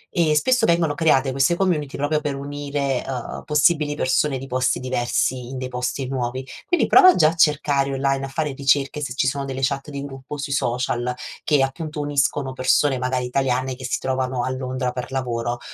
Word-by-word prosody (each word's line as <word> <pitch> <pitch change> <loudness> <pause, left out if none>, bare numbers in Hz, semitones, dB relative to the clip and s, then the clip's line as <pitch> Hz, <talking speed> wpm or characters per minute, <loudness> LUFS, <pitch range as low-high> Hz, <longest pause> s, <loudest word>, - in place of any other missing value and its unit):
e 160 -4 +3
spesso 245 +9 +3
vengono 170 -5 +2
create 140 -3 +3
queste 135 +6 +2
community 170 -7 -1
proprio 145 +2 0
per 145 -2 -2
unire, 140 -1 -3
uhm, 125 -3 -5
possibili 150 0 +2
persone 135 0 +1
di 135 - -8
posti 130 0 0
diversi 125 0 -1
in 130 - -6
dei 130 - -4
posti 125 +1 -3
nuovi. 130 0 -3 0.2
Quindi 350 - +2
prova 370 -2 +7
già 155 -3 +5
a 165 - -5
cercare 145 -3 +2
online, 135 0 0
a - - -7
fare 150 +1 -2
ricerche 140 +1 +1
se 140 -4 -3
ci 135 - +1
sono 140 0 -1
delle 135 -1 -5
chat 135 +2 -1
di 140 -1 -5
gruppo 135 +1 -8
sui 140 0 -3
social, 125 -1 -1 0.3
che, 145 -3 +3
appunto, 150 +3 -4
uniscono 140 -1 0
persone 130 +1 +2
magari 125 0 -1
italiane 130 0 0
che 130 0 -8
si - - -1
trovano 130 -1 -1
a 130 - -1
Londra 130 -1 -3
per 125 +1 -6
lavoro. 120 -2 -2
135 Hz, 190 wpm, -22 LUFS, 130-145 Hz, 0.3 s, prova